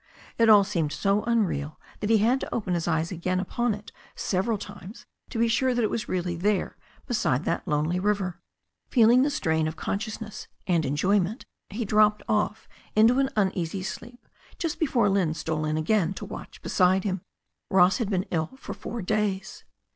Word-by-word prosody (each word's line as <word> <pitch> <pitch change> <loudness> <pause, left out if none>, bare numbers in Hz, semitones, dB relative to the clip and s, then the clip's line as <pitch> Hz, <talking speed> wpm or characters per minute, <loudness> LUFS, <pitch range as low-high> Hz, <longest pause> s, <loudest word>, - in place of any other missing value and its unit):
It 230 -1 +5
all 210 -2 +8
seemed 170 -7 -1
so 200 +4 +1
unreal 185 -11 0 0.2
that 210 - -2
he 225 - +6
had 235 +5 +3
to - - -6
open 200 -6 -1
his 170 -1 -1
eyes 160 +1 0
upon 185 +6 -1
it 210 +1 -12 0.2
several 210 +4 0
times 205 +3 -10 0.2
to - - -5
be 230 +1 +3
sure 250 +2 +2
that 240 - +1
it 215 - +1
was 225 - -3
really 180 -1 -1
there 195 +3 0 0.3
beside 165 - 0
that 170 - -2
lonely 155 +3 0
river. 195 -2 -1 0.5
Feeling 240 0 +5
the 285 - +3
strain 160 - 0
of 155 - -4
consciousness 220 +1 -5 0.2
and 170 -4 +1
enjoyment, 190 - +1 0.2
he 220 +3 -3
dropped 210 +1 +3
off 210 0 0 0.3
into 230 +4 +5
an 270 -1 +2
uneasy 190 -2 0
sleep 240 +5 -8 0.3
just 330 -3 -3
before 255 -9 +2
Lynne 190 -5 +1
stole 155 -1 -2
in 155 0 0
again 190 +3 +1
to - - -6
watch - - -10
beside 185 0 +3
him. 190 -3 -2 0.5
Ross 185 +2 +4
had 230 - 0
already 190 -2 -1
been 175 - -1
ill 160 - -3
four 235 -4 -6
days. 205 -1 -2
200 Hz, 175 wpm, -26 LUFS, 175-220 Hz, 0.5 s, all